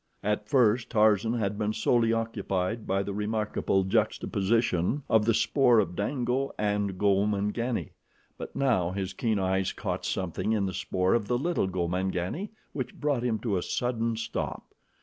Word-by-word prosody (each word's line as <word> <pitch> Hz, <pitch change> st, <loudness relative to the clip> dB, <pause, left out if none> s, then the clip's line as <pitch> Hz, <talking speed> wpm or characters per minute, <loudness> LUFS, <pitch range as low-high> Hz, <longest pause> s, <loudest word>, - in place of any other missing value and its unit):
At 105 Hz, 0 st, -1 dB
first 120 Hz, -3 st, +3 dB
Tarzan 110 Hz, 0 st, +3 dB
had 105 Hz, -3 st, -1 dB
been 105 Hz, 0 st, 0 dB
solely 115 Hz, 0 st, +2 dB
occupied 110 Hz, -2 st, -2 dB
by 95 Hz, +1 st, +1 dB
the 100 Hz, -, -4 dB
remarkable 105 Hz, -2 st, 0 dB
juxtaposition 105 Hz, -, +1 dB
of 110 Hz, -1 st, +3 dB
the 115 Hz, -, +3 dB
spoor 125 Hz, -3 st, +4 dB
of 90 Hz, -5 st, +1 dB
Dango 125 Hz, +5 st, -1 dB
and 105 Hz, -2 st, -1 dB
Gomangani, 105 Hz, +4 st, 0 dB, 0.4 s
but -, -, -8 dB
now 120 Hz, -11 st, +2 dB
his 95 Hz, 0 st, -3 dB
keen 110 Hz, -3 st, 0 dB
eyes 95 Hz, 0 st, 0 dB
caught -, -, -3 dB
something 95 Hz, +3 st, -1 dB
in 105 Hz, -3 st, +1 dB
the 95 Hz, -, -3 dB
spoor 90 Hz, +1 st, 0 dB
of 115 Hz, -3 st, +1 dB
the 120 Hz, -, +1 dB
little 165 Hz, -, 0 dB
Gomangani 95 Hz, -, -2 dB, 0.2 s
which 130 Hz, -4 st, -4 dB
brought 145 Hz, -4 st, 0 dB
him 120 Hz, -2 st, 0 dB
to 105 Hz, -6 st, 0 dB
a -, -, -1 dB
sudden 115 Hz, 0 st, -1 dB
stop. 115 Hz, -, -4 dB
105 Hz, 155 wpm, -28 LUFS, 95-115 Hz, 0.4 s, spoor